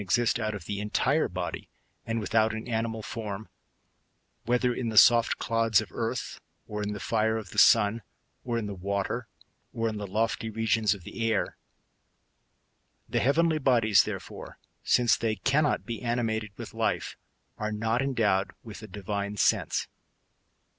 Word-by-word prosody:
199 100 +5 +1
exist 120 - +1
out 110 -2 -2
of 105 - -8
the 100 -1 -3
entire 130 +8 +1
body, 90 0 -5 0.4
and 115 0 -1
without 110 0 +1
an 110 - -6
animal 115 -1 -2
form, 110 -3 -5 1.0
whether 125 +1 +2
in 120 -1 -2
the 110 - -3
soft 115 +1 +6
clods 115 -2 +2
of 105 -7 -6
earth, - - -4 0.3
or 105 0 -4
in 105 0 -2
the 105 - -6
fire 110 +1 +1
of 105 -5 -7
the - - 0
sun, 115 0 +5 0.4
or 120 -2 -2
in 115 - -2
the 105 - -4
water, 100 +1 -3 0.4
or 115 0 -1
in 110 -1 -3
the 105 -1 -5
lofty 115 +3 -1
regions 110 -1 +1
of 95 - -13
the 115 +5 -2
air. 110 - -1 1.5
The - - 0
heaven' 155 +6 +3
ly 155 -1 0
bodies, 115 -7 +4
therefore, - - -7 0.3
since 120 -2 +4
they 110 -1 -1
cannot 140 +8 +1
be 115 -2 -5
animated 115 -3 -1
with - - -8
life, - - -1 0.4
are 105 0 -2
not 110 +3 0
endowed 110 -8 +1
with 110 -2 -9
a 110 - -9
divine 100 +1 -4
sense. - - +1
110 Hz, 165 wpm, -28 LUFS, 105-115 Hz, 1.5 s, soft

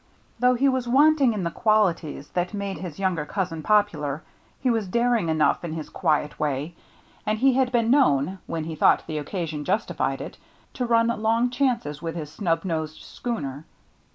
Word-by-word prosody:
Though 250 +1 +4
he 270 +3 +2
was 260 -2 0
wanting 280 +1 +5
in 210 -4 -3
the 170 - -1
qualities 180 -10 +1
that 180 +3 -2
made 200 -1 -4
his 175 -5 -7
younger 185 -5 0
cousin 165 0 -3
popular, 160 -8 +1 0.4
he 260 - -2
was 225 -4 0
daring 235 -3 +1
enough 155 +1 +2
in 165 -2 -4
his 160 -2 -6
quiet 150 -1 0
way, 150 +2 -2 0.5
and 215 0 0
he 265 +3 +4
had 255 -1 +2
been 235 -2 +2
known, 190 - +3
when 165 -1 -3
he 160 +1 -5
thought 155 - +4
the 155 -2 -3
occasion 155 -1 -4
justified 205 +7 -1
it, - - -8 0.4
to 250 -2 -2
run 230 0 +3
long 230 +3 +2
chances 240 - -1
with 165 0 -4
his 150 -3 -6
snub 165 -2 -1
nosed 160 -3 -3
schooner. 145 - -5
190 Hz, 180 wpm, -25 LUFS, 155-235 Hz, 0.5 s, wanting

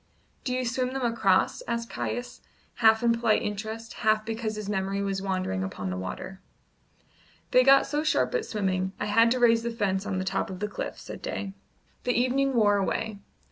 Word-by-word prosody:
"Do 255 - -2
you 255 0 -1
swim 255 +1 -1
them 265 -2 -1
across?" 205 -5 +2
asked 235 -1 -3
Caius, 245 0 -4 0.4
half 220 0 +5
in 235 -1 +4
polite 230 -2 +2
interest, 220 +2 -5
half 215 -1 +2
because 225 -1 -3
his 210 -1 -5
memory 195 -1 -1
was 195 -1 -2
wandering 185 - -1
upon 95 0 -4
the - - -3
water. 95 - -6 1.1
"They 255 - +6
got 275 +1 +6
so 295 +2 -1
sharp 315 - +1
at 480 -3 0
swimming, 190 -3 -1
I - - -1
had 230 +3 +4
to 255 +2 +1
raise 230 -1 +5
the 235 - -2
fence 205 -3 -1
on 195 -3 -1
the 185 - -2
top 195 +1 -1
of 185 -1 -7
the 210 - -1
cliff," - - -5
said - - -9
Day. 195 -2 -4 0.5
The 250 - +1
evening 265 +2 +1
wore 205 -3 +4
away. 205 +2 -2
220 Hz, 195 wpm, -27 LUFS, 195-240 Hz, 1.1 s, They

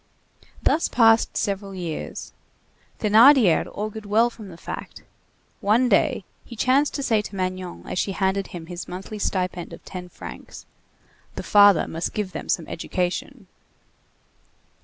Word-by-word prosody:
Thus 330 - +2
passed 225 -1 +4
several 195 -1 -2
years. 170 -4 -6 0.7
Thénardier 220 - +6
augured 215 0 -5
well 225 +4 +3
from 220 -3 -11
the 170 -3 -11
fact. - - -8 0.6
One 230 +5 +3
day, 195 -2 +2 0.2
he 235 - -11
chanced 265 +6 +2
to 280 - -2
say 225 -5 +2
to 210 - -9
Magnon 185 -1 -4
as - - -3
she 195 - -1
handed 190 0 0
him 170 -2 -8
his 175 +1 -7
monthly 190 +4 -7
stipend 180 -3 -2
of 170 - -12
ten 180 -1 -8
francs: - - -10 0.7
"The - - -5
father 205 -2 +6
must 165 +1 -4
give 210 -3 -2
them - - -7
some 165 - 0
education." 185 +8 -3
200 Hz, 140 wpm, -23 LUFS, 180-220 Hz, 0.7 s, Thénardier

